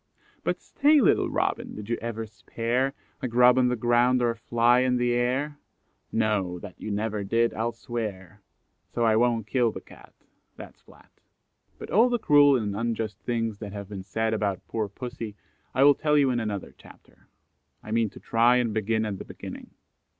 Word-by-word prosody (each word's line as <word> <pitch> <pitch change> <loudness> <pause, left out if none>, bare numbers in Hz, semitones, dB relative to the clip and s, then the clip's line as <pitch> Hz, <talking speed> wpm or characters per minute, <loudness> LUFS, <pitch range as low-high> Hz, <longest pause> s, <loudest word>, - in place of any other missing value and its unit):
But - - -1
stay, 295 +1 +3
little 255 - +3
Robin, - - -2
did 105 -1 -8
you 115 - 0
ever 115 -1 -4
spare, 120 +4 -2 0.3
A - - -1
grub 125 +1 +5
on 125 - +4
the 125 - +1
ground 120 +2 +3
or 120 -1 +2
a - - -6
fly 120 +1 +3
in 125 0 +2
the 120 0 +1
air? 130 +5 -1 0.5
No, 105 -5 0
that 90 - -11
you - - -5
never 105 0 -2
did, 115 +4 +1
I'll 115 +2 -1
swear; 105 -4 -6 0.5
So 120 - -2
I 110 -1 +4
won't 115 -1 +2
kill 120 0 +1
the - - -7
Cat, - - -17 0.4
That's - - -12
flat." - - -20 0.7
But - - -9
all 230 +5 +5
the 240 - +1
cruel 145 - +5
and 105 -4 -3
unjust 115 -1 -3
things 115 -3 -2
that 105 -2 -7
have 100 -1 -7
been 100 -2 -6
said 110 +3 -2
about 100 -3 -2
poor 110 -3 -2
pussy 115 -1 -7 0.4
I 130 - +2
will 145 0 +8
tell 150 +1 +1
you 140 -3 +4
in 120 - 0
another 105 -4 -4
chapter. - - -19 0.6
I 110 - -8
mean 115 -1 +1
to - - -13
try 120 +2 +3
and 120 -3 +1
begin 110 +1 0
at 100 -3 -4
the - - -6
beginning. - - -9
115 Hz, 190 wpm, -26 LUFS, 110-125 Hz, 0.7 s, will